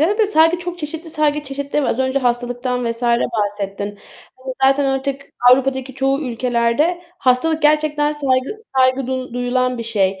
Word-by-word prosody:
de 400 +8 +2
de, 430 - +4
saygı 330 -3 +4
çok 350 0 -6
çeşitli 320 +1 -6
saygı 300 -1 +1
çeşitleri 280 +1 -3
var. - - 0
Az 240 - -2
önce 260 +1 +1
hastalıktan 245 0 -1
vs. 230 +1 -5
bahsettin. 205 -4 -1 0.4
Hani 260 0 -7
zaten 275 +1 +4
artık 270 +1 -2 0.2
Avrupa'daki 265 0 +1
çoğu 270 +1 0
ülkelerde 245 +7 0 0.2
hastalık 300 +5 +1
gerçekten 300 0 +2
saygı, 275 +5 0 0.2
saygı 260 0 +3
du 255 -1 -4
duyulan 250 0 0
bir - - -3
şey. 195 -4 0
265 Hz, 160 wpm, -19 LUFS, 245-295 Hz, 0.4 s, de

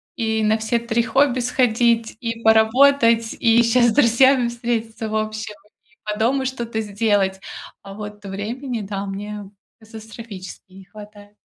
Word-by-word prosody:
И 220 -2 -1
на 215 +1 +2
все 220 +2 -1
3 235 0 -1
хобби 255 +2 +1
сходить, 235 -2 +1
и 230 -1 -4
поработать, 230 +1 +4
и 235 0 +4
щас 240 +1 +3
с - - -1
друзьями 260 -1 +4
встретиться 230 -2 -4
в 215 - -4
общем, 215 0 -4 0.3
и 215 -2 -32 0.2
по 210 - -7
дому 260 +4 +1
что-то 235 -3 -4
сделать. 205 -2 0 0.4
А 195 - -11
вот 210 0 -9
времени, 225 +6 -5
да, 200 0 -5
мне 205 0 -7 0.3
катастрофически 220 -4 -11
не 190 0 -14
хватает. 205 0 -14
225 Hz, 145 wpm, -21 LUFS, 210-235 Hz, 0.4 s, поработать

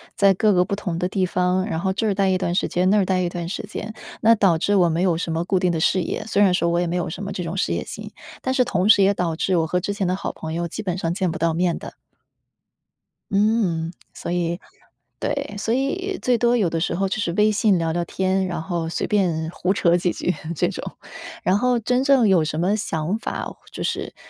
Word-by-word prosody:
在 200 -4 +5
各 210 +1 +3
个 180 -1 +4
不 200 +2 -2
同 180 -4 -4
的 180 - 0
地 190 -2 +1
方， 180 +1 +1
然 180 -6 -2
后 190 +2 0
这 200 +4 -1
儿 205 - +2
呆 195 -1 +2
一 185 - +2
段 175 -2 -1
时 180 - +1
间， 180 +1 +1
那 210 - +4
儿 195 - +3
呆 185 0 +1
一 175 - 0
段 175 -1 -5
时 - - -4
间。 215 +1 -6 0.3
那 230 +1 +6
导 190 -6 +3
致 205 +3 +1
我 180 -3 +4
没 165 +2 0
有 180 -3 +2
什 165 -1 -3
么 165 - 0
固 185 +1 +1
定 180 -1 +2
的 165 - -1
事 180 +3 +2
业， - - -3
虽 205 -1 +3
然 190 -3 +4
说 170 -1 +1
我 170 0 +1
也 175 - +1
没 175 - -2
有 175 - -1
什 200 +4 -6
么 200 - -4
这 190 -2 -4
种 170 +3 -4
事 - - 0
业 - - -2
心， - - -8 0.3
但 260 - -1
是 260 -1 +3
同 200 -5 0
时 200 - +7
也 195 +1 +4
导 175 -4 -1
致 180 +2 +1
我 160 - +2
和 180 +3 0
之 190 +3 -3
前 200 -3 -1
的 185 - +1
好 195 - -4
朋 160 0 -7
友， 170 +1 -2
基 215 +6 -6
本 180 -3 -2
上 165 -2 -1
见 185 -1 0
不 - - -5
到 165 0 +1
面 175 0 +1
的。 - - -9 1.4
嗯， 195 -5 +1 0.2
所 170 - -6
以 175 0 -1 0.6
对， 280 -7 -3
所 225 - -2
以 370 +9 -1
最 250 -1 +2
多 240 +1 +3
有 200 - +2
的 165 - -2
时 170 +1 -1
候 195 +1 0
就 200 - -2
是 175 - -1
微 210 +2 +3
信 210 -2 +3
聊 165 -1 0
聊 175 +1 -1
天， 190 +1 0
然 175 - -3
后 170 -2 -2
随 - - -2
便 170 -6 0
胡 180 +1 -1
扯 175 -3 +3
几 175 0 0
句， 180 - -1 0.2
这 - - +1
种。 - - -6 0.5
然 185 - +3
后 250 -1 +2
真 250 +3 +1
正 270 -5 +4
有 185 -5 +4
什 155 +1 -2
么 190 +4 +2
想 180 -1 -2
法， - - -4
或 - - -9
就 - - -5
是 - - -3
185 Hz, 285 characters per minute, -22 LUFS, 170-205 Hz, 1.4 s, 时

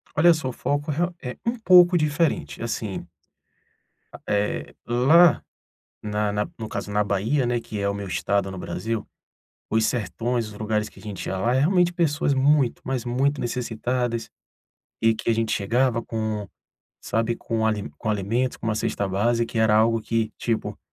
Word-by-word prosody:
Olha 170 +3 +6
só, 155 -5 -3
o - - -3
foco 145 +5 -1
re 175 +5 0
é 125 - -5
um 235 +1 -1
pouco 180 -4 +6
diferente, 155 -2 0
assim 110 -6 -4 1.2
Eh 105 0 -1
lá, 145 +8 +5 0.6
na 105 0 -1
na 105 0 -1
no 110 -2 -5
caso 105 - -5
na 105 0 +2
Bahia, 110 +7 0
né, 120 0 0
que 110 -2 -6
é 100 - 0
o 100 - 0
meu 100 -1 -5
Estado 100 +2 0
no 95 - -7
Brasil, 110 +6 -3 0.6
os 110 0 +2
sertões, 115 +2 -1
os 105 - -10
lugares 105 0 -1
que - - -17
a - - -15
gente 105 -3 -6
ia 95 - -2
lá 115 +6 +1
é - - +3
realmente 175 +3 +3
pessoas 150 -4 +1
muito, 135 -1 +2
mas 130 -2 -3
muito 135 +4 +1
necessitadas, 120 0 -2 0.7
e 115 0 +4
que 115 - -2
a - - +5
gente 115 0 0
chegava 115 +3 +1
com, 110 -3 -3 0.5
sabe 115 +1 0
com 115 -1 -2
ali 105 -2 -1
com 110 - -3
alimentos, 110 +5 0
com - - -9
uma 110 - +1
cesta 105 -2 -1
básica 115 +5 0
e - - +2
era 110 -1 +4
algo 115 +1 +3
que, 110 -1 -1
tipo, 115 -2 -2
115 Hz, 180 wpm, -24 LUFS, 105-130 Hz, 1.2 s, Olha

